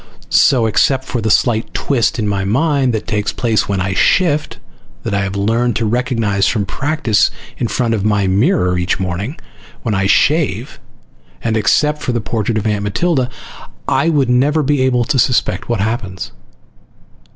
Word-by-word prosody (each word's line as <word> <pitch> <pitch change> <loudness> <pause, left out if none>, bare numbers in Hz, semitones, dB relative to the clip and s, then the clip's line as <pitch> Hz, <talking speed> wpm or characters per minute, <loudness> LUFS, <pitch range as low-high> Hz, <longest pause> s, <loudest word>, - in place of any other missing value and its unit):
So, 125 -4 +4
except 130 +4 +1
for 120 - -3
the 110 - -1
slight 110 +2 +1
twist 130 -4 0
in 110 -3 -1
my 100 -1 -1
mind 135 +5 +1
that 110 -2 -3
takes 105 -2 -1
place 115 -4 0
when 100 -1 0
I 95 +1 -1
shift, 150 - +1 0.5
that 110 - -3
I 100 - +1
have 95 0 -3
learned 115 +4 0
to 115 - 0
recognize 115 -4 0
from 105 -4 0
practice 140 - +1 0.3
in 120 - 0
front 115 0 -1
of 105 -3 -1
my 105 -2 +1
"mirror" 90 -2 +1
each 90 +1 -1
morning 95 - -4 0.4
when 110 - -1
I 100 -1 +1
shave, 135 - +1 0.6
and 115 -1 0
except 150 +8 +1
for 125 - -2
the 120 - 0
portrait 110 0 -2
of 110 - -2
Aunt 105 -2 0
Matilda, 130 - 0 0.6
I 165 - +2
would 145 -5 +2
never 140 +5 +2
be 145 -1 +1
able 125 -2 +2
to 135 +2 0
suspect 115 -7 +1
what 115 -4 0
happens. 100 -4 -3
115 Hz, 175 wpm, -16 LUFS, 100-130 Hz, 0.6 s, So